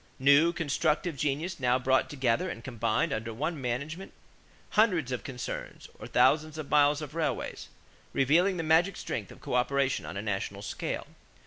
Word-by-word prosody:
New 140 Hz, +5 st, +5 dB
constructive 160 Hz, +1 st, 0 dB
genius 150 Hz, +6 st, -2 dB
now 125 Hz, -1 st, +3 dB
brought 130 Hz, +1 st, +2 dB
together 125 Hz, -5 st, 0 dB
and 115 Hz, -, -7 dB
combined 125 Hz, +4 st, 0 dB
under 115 Hz, -2 st, -3 dB
one 150 Hz, +6 st, -3 dB
management 140 Hz, +9 st, -4 dB, 0.6 s
hundreds 180 Hz, -, +3 dB
of 125 Hz, -, -3 dB
concerns 125 Hz, -3 st, -6 dB
or -, -, -8 dB
thousands 155 Hz, 0 st, +3 dB
of 155 Hz, -3 st, -6 dB
miles 145 Hz, 0 st, +4 dB
of 150 Hz, -1 st, -8 dB
railways, 165 Hz, -1 st, -3 dB, 0.4 s
revealing 170 Hz, +8 st, +3 dB
the 165 Hz, -, -2 dB
magic 165 Hz, +5 st, +3 dB
strength 100 Hz, -5 st, -4 dB
of -, -, -14 dB
coöperation 135 Hz, +2 st, 0 dB
on -, -, -6 dB
a -, -, -2 dB
national 100 Hz, -1 st, -3 dB
scale. -, -, -4 dB
140 Hz, 155 wpm, -29 LUFS, 125-160 Hz, 0.6 s, New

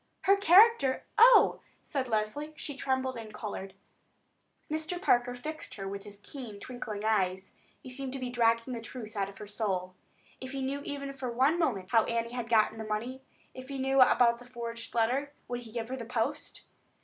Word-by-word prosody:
"Her 395 Hz, -, +5 dB
character? 395 Hz, -, +5 dB
Oh!" -, -, +7 dB, 0.2 s
said 270 Hz, -4 st, -2 dB
Leslie. 235 Hz, +8 st, -2 dB
She 290 Hz, -, -6 dB
trembled 260 Hz, -1 st, -1 dB
and 225 Hz, -2 st, -8 dB
colored. 195 Hz, -3 st, -6 dB, 0.9 s
Mr. 315 Hz, +3 st, -3 dB
Parker 245 Hz, -8 st, +2 dB
fixed 310 Hz, +5 st, -6 dB
her 195 Hz, -1 st, -5 dB
with 200 Hz, 0 st, -6 dB
his 205 Hz, -1 st, -7 dB
keen 220 Hz, -2 st, -9 dB
twinkling 215 Hz, -3 st, -6 dB
eyes. 190 Hz, -3 st, 0 dB, 0.3 s
He 255 Hz, -, -9 dB
seemed 265 Hz, 0 st, -4 dB
to 270 Hz, -, -4 dB
be 250 Hz, -1 st, -4 dB
dragging 230 Hz, +1 st, +2 dB
the 235 Hz, -, -4 dB
truth 225 Hz, -1 st, -8 dB
out 195 Hz, -1 st, -1 dB
of 200 Hz, -, -13 dB
her 210 Hz, -, -8 dB
soul. 195 Hz, -3 st, -2 dB, 0.5 s
If 260 Hz, +1 st, -7 dB
he 270 Hz, -1 st, -3 dB
knew 275 Hz, +2 st, -2 dB
even 280 Hz, -1 st, -4 dB
for 260 Hz, -2 st, -4 dB
one 270 Hz, +8 st, +3 dB
moment 210 Hz, -, 0 dB
how 225 Hz, -2 st, +5 dB
Annie 235 Hz, 0 st, -1 dB
had 240 Hz, -2 st, -4 dB
got 220 Hz, -1 st, +4 dB
that 220 Hz, -1 st, -6 dB
money, 240 Hz, +5 st, -3 dB, 0.3 s
if 255 Hz, +1 st, -10 dB
he 275 Hz, -, -4 dB
knew 270 Hz, 0 st, +3 dB
about 235 Hz, -2 st, +5 dB
the 245 Hz, -, -13 dB
forged 235 Hz, -1 st, -7 dB
letter, 260 Hz, +5 st, +1 dB
would 245 Hz, 0 st, -3 dB
he 230 Hz, -2 st, -12 dB
give 230 Hz, 0 st, -4 dB
her 260 Hz, -, -3 dB
the 240 Hz, -, -5 dB
post? 245 Hz, +5 st, -3 dB
245 Hz, 195 wpm, -30 LUFS, 220-270 Hz, 0.9 s, Oh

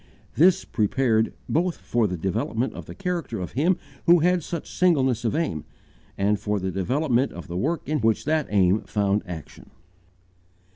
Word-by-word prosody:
This 180 Hz, +4 st, +4 dB
prepared 110 Hz, 0 st, +1 dB, 0.2 s
both 175 Hz, +2 st, 0 dB
for 120 Hz, -3 st, 0 dB
the 90 Hz, -2 st, -3 dB
development 110 Hz, +7 st, -1 dB
of -, -, -9 dB
the -, -, -9 dB
character 175 Hz, -, -3 dB
of 90 Hz, -, -5 dB
him 165 Hz, +8 st, +2 dB, 0.3 s
who 175 Hz, +1 st, +8 dB
had 180 Hz, +1 st, +3 dB
such 170 Hz, 0 st, -5 dB
singleness 135 Hz, -10 st, +2 dB
of 115 Hz, -, 0 dB
aim, 85 Hz, -, -1 dB, 0.5 s
and 100 Hz, +1 st, +1 dB
for 105 Hz, +1 st, -1 dB
the 95 Hz, 0 st, -2 dB
development 125 Hz, -, +1 dB
of 85 Hz, -, -9 dB
the 85 Hz, -, -6 dB
work 155 Hz, -, -1 dB
in 150 Hz, +1 st, 0 dB
which 110 Hz, -2 st, +1 dB
that 155 Hz, 0 st, +1 dB
aim 100 Hz, 0 st, +3 dB
found 100 Hz, 0 st, 0 dB
action. 85 Hz, -4 st, -9 dB
120 Hz, 165 wpm, -24 LUFS, 100-160 Hz, 0.5 s, who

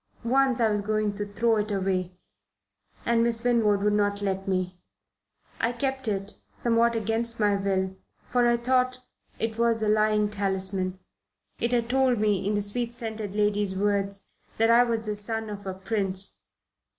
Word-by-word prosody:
Once 260 Hz, 0 st, +3 dB
I 230 Hz, -, +4 dB
was 210 Hz, -1 st, 0 dB
going 215 Hz, 0 st, 0 dB
to 205 Hz, 0 st, -4 dB
throw 225 Hz, +2 st, +2 dB
it 210 Hz, +1 st, -1 dB
away 185 Hz, -2 st, -1 dB, 0.9 s
and 235 Hz, 0 st, +3 dB
Miss 230 Hz, 0 st, +1 dB
Winwood 220 Hz, -5 st, +2 dB
would 210 Hz, 0 st, +3 dB
not 205 Hz, -1 st, +1 dB
let 195 Hz, -1 st, -2 dB
me. 185 Hz, -1 st, -2 dB, 0.8 s
I 230 Hz, -, +1 dB
kept 265 Hz, +1 st, -2 dB
it, 200 Hz, -1 st, -3 dB, 0.2 s
somewhat 235 Hz, 0 st, +2 dB
against 225 Hz, +1 st, -1 dB
my 205 Hz, -1 st, +3 dB
will, 190 Hz, -1 st, -1 dB, 0.3 s
for 245 Hz, -1 st, +2 dB
I 240 Hz, 0 st, +3 dB
thought 255 Hz, +1 st, +1 dB, 0.4 s
it 225 Hz, 0 st, -3 dB
was 230 Hz, -1 st, +3 dB
a -, -, +1 dB
lying 215 Hz, 0 st, +3 dB
talisman. 190 Hz, -2 st, -1 dB, 0.6 s
It 235 Hz, -, 0 dB
had 235 Hz, -2 st, +1 dB
told 260 Hz, -1 st, +2 dB
me, 205 Hz, -2 st, +1 dB
in 210 Hz, -, +1 dB
the 205 Hz, -, +1 dB
sweet 235 Hz, +3 st, -1 dB
scented 220 Hz, -4 st, -5 dB
lady's 205 Hz, -2 st, +1 dB
words, 200 Hz, 0 st, -1 dB, 0.2 s
that 225 Hz, +1 st, +4 dB
I 235 Hz, +1 st, +7 dB
was 230 Hz, -2 st, -1 dB
the 210 Hz, -1 st, -2 dB
son 220 Hz, +1 st, -3 dB
of 200 Hz, -1 st, -7 dB
a 190 Hz, -, -3 dB
prince. 195 Hz, -1 st, -2 dB
210 Hz, 170 wpm, -26 LUFS, 200-235 Hz, 0.9 s, I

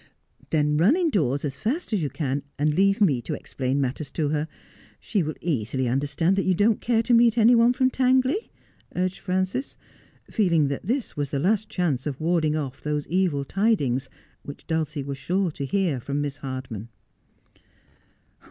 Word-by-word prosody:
' -, -, -45 dB
Then 150 Hz, -1 st, +2 dB
run 190 Hz, -, +5 dB
indoors 160 Hz, -, +1 dB
as 140 Hz, -2 st, -5 dB
fast 260 Hz, -, -2 dB
as 200 Hz, -, +1 dB
you 145 Hz, -, -1 dB
can, 140 Hz, -2 st, -2 dB, 0.2 s
and 150 Hz, +1 st, +1 dB
leave 195 Hz, +4 st, +3 dB
me 145 Hz, -12 st, +3 dB
to -, -, -4 dB
explain 130 Hz, +1 st, -2 dB
matters 140 Hz, +2 st, -2 dB
to 155 Hz, -3 st, 0 dB
her. 150 Hz, +1 st, -1 dB, 0.5 s
She 205 Hz, -, -1 dB
will 155 Hz, -1 st, -3 dB
easily 130 Hz, -5 st, -1 dB
understand 145 Hz, +8 st, +1 dB
that 195 Hz, -, +2 dB
you 185 Hz, -, +2 dB
don't 210 Hz, +4 st, +2 dB
care 230 Hz, -1 st, +2 dB
to 245 Hz, -, +1 dB
meet 235 Hz, -1 st, +5 dB
any 230 Hz, +2 st, +6 dB
one 235 Hz, 0 st, +5 dB
from 255 Hz, +1 st, +2 dB
Tangley,' 260 Hz, -, +2 dB, 0.5 s
urged 185 Hz, +1 st, -1 dB
Frances, 185 Hz, +7 st, -2 dB, 0.5 s
feeling 170 Hz, -9 st, +2 dB
that 140 Hz, +5 st, -5 dB
this 250 Hz, +2 st, -1 dB
was 145 Hz, -2 st, -2 dB
the 140 Hz, -, -2 dB
last 205 Hz, +8 st, +1 dB
chance 155 Hz, -8 st, -1 dB
of 140 Hz, -3 st, -4 dB
warding 155 Hz, -2 st, +1 dB
off 140 Hz, -4 st, -4 dB
those 150 Hz, -1 st, -2 dB
evil 170 Hz, -6 st, +1 dB
tidings 145 Hz, -, +1 dB, 0.3 s
which 140 Hz, -, -10 dB
Dulcia 155 Hz, -3 st, -2 dB
was 140 Hz, 0 st, -5 dB
sure 185 Hz, +1 st, 0 dB
to 140 Hz, -2 st, -5 dB
hear 180 Hz, -6 st, 0 dB
from 140 Hz, +4 st, -3 dB
Miss 145 Hz, -1 st, -3 dB
Htrdman. 130 Hz, -6 st, -6 dB
155 Hz, 180 wpm, -25 LUFS, 140-200 Hz, 0.5 s, any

